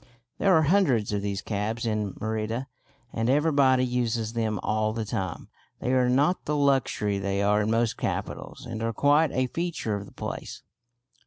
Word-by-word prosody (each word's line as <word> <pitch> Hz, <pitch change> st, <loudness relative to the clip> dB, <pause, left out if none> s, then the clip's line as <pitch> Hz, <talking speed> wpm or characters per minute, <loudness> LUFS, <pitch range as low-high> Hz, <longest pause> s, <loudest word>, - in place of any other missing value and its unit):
There 195 Hz, -, +3 dB
are 160 Hz, -, +5 dB
hundreds 140 Hz, -, +2 dB
of 100 Hz, -, 0 dB
these 100 Hz, -1 st, -3 dB
cabs 110 Hz, +3 st, -2 dB
in 105 Hz, -3 st, -2 dB
Merida, 110 Hz, +3 st, -2 dB, 0.5 s
and 115 Hz, +1 st, 0 dB
everybody 140 Hz, -3 st, +4 dB
uses 120 Hz, -3 st, -1 dB
them 110 Hz, -3 st, -1 dB
all 110 Hz, 0 st, 0 dB
the 110 Hz, -1 st, -3 dB
time. 95 Hz, -5 st, -4 dB, 0.3 s
They 125 Hz, -, -1 dB
are 125 Hz, -1 st, +3 dB
not 145 Hz, +8 st, +2 dB
the 150 Hz, -, 0 dB
luxury 135 Hz, -8 st, +1 dB
they 100 Hz, +1 st, -1 dB
are 105 Hz, +1 st, +3 dB
in 105 Hz, -, 0 dB
most 115 Hz, 0 st, +1 dB
capitals, -, -, -4 dB
and 115 Hz, -2 st, -5 dB
are 115 Hz, 0 st, -1 dB
quite 145 Hz, +6 st, +3 dB
a 130 Hz, +1 st, +1 dB
feature 165 Hz, -5 st, -3 dB
of 100 Hz, -1 st, -4 dB
the -, -, -14 dB
place. -, -, -6 dB
115 Hz, 175 wpm, -26 LUFS, 105-135 Hz, 0.5 s, are